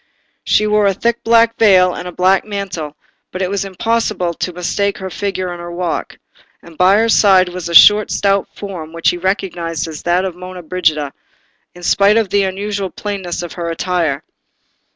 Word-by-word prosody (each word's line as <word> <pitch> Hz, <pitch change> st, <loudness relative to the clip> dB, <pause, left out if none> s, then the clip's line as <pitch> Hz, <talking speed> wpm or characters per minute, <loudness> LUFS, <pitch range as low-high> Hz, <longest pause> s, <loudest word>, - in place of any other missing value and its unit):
She 215 Hz, -, +2 dB
wore 210 Hz, -1 st, +2 dB
a 195 Hz, -, +1 dB
thick 235 Hz, +3 st, -1 dB
black 230 Hz, 0 st, +3 dB
veil 185 Hz, -4 st, +5 dB
and 180 Hz, -1 st, -7 dB
black 185 Hz, +1 st, +3 dB
mantle, 190 Hz, -8 st, -5 dB, 0.4 s
but 185 Hz, +1 st, -3 dB
it 185 Hz, -, -2 dB
was 200 Hz, -1 st, -1 dB
impossible 195 Hz, -2 st, -1 dB
to 180 Hz, -, -4 dB
mistake 190 Hz, +3 st, -2 dB
her 190 Hz, -1 st, -7 dB
figure 190 Hz, -2 st, -3 dB
and 175 Hz, 0 st, -7 dB
her 175 Hz, 0 st, -7 dB
walk; 175 Hz, -1 st, -4 dB, 0.5 s
and 170 Hz, -1 st, -14 dB
by 185 Hz, +4 st, +4 dB
her 225 Hz, +1 st, +2 dB
side 190 Hz, -4 st, +4 dB
was 180 Hz, -1 st, -6 dB
a 170 Hz, -, -2 dB
short 210 Hz, +3 st, +7 dB
stout 200 Hz, -1 st, +1 dB
form, 175 Hz, -6 st, -8 dB
which 165 Hz, 0 st, +1 dB
he 175 Hz, -, -5 dB
recognised 175 Hz, -4 st, -2 dB
as 155 Hz, -2 st, -8 dB
that 175 Hz, +2 st, +1 dB
of 185 Hz, -3 st, -4 dB
Monna 180 Hz, 0 st, -9 dB
Brigida, 155 Hz, -4 st, -1 dB, 0.6 s
in 175 Hz, -, -13 dB
spite 200 Hz, +4 st, +3 dB
of 220 Hz, -4 st, +1 dB
the 200 Hz, 0 st, +3 dB
unusual 195 Hz, +1 st, -3 dB
plainness 190 Hz, -5 st, -5 dB
of 175 Hz, -, -7 dB
her 170 Hz, -1 st, -4 dB
attire. 165 Hz, -4 st, -1 dB
185 Hz, 185 wpm, -16 LUFS, 175-200 Hz, 0.6 s, short